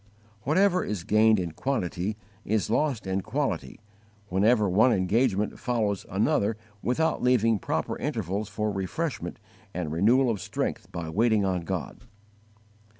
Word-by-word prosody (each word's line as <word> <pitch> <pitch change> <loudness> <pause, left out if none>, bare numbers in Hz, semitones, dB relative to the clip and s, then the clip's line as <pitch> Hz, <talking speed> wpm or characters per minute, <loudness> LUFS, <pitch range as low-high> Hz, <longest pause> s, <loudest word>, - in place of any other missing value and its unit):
Whatever 180 +5 +3
is 100 -5 -3
gained 110 +2 +4
in 85 -2 -3
quantity 105 - -2 0.3
is 105 0 0
lost 135 -4 0
in 95 +1 -1
quality 110 - -3 0.5
whenever 105 +3 +3
one 110 +7 +4
engagement 105 +2 +1
follows 110 -5 -1
another 105 - +1 0.2
without 160 +6 0
leaving 115 -4 +3
proper - - -2
intervals 105 - -2
for 105 +1 -2
refreshment 105 - -3 0.4
and 85 -4 -3
renewal 115 +10 +3
of 105 - -3
strength - - -3
by 85 -2 -5
waiting 110 +1 +2
on 90 -2 0
God. 85 - -4
105 Hz, 130 wpm, -27 LUFS, 95-125 Hz, 0.5 s, gained